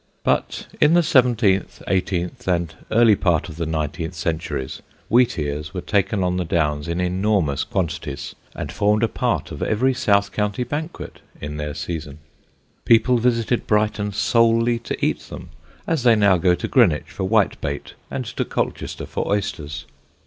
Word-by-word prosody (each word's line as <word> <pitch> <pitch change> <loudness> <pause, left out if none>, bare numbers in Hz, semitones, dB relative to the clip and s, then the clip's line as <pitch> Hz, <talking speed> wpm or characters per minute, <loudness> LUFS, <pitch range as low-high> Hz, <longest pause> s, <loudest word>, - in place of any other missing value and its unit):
But - - 0 0.2
in 150 +3 +6
the 175 - +5
seventeenth, 115 - +2
eighteenth 90 -2 -1
and 85 -3 0 0.2
early 115 -1 +5
part 85 -4 +1
of 80 - -10
the 85 -1 -2
nineteenth 80 +2 -3
centuries, 80 -5 -3 0.3
wheatears 75 - +1
were 90 - -2
taken 100 +1 0
on 90 0 0
the 90 - 0
Downs 75 -3 0
in 85 +1 -2
enormous 90 -5 +1
quantities 85 -6 -3 0.2
and - - -5
formed 105 +1 +2
a - - +4
part - - -1
of - - -7
every 130 +5 +2
south 100 -4 +2
county 105 +3 -1
banquet 150 +7 -6 0.2
in 75 0 -6
their 75 -1 -4
season. 80 -4 -5 0.7
People 115 +2 +4
visited 120 0 +1
Brighton 105 -1 +1
solely 115 +3 +2
to 115 - -3
eat - - 0
them, - - -10 0.3
as 165 -4 0
they 120 -2 +5
now 100 -3 +4
go 90 +1 +3
to - - -4
Greenwich - - +3
for 95 - -3
whitebait 95 -8 0 0.2
and - - -4
to - - -2
Colchester - - -3
for - - -3
oysters. 80 -8 -3
95 Hz, 155 wpm, -22 LUFS, 80-115 Hz, 0.7 s, in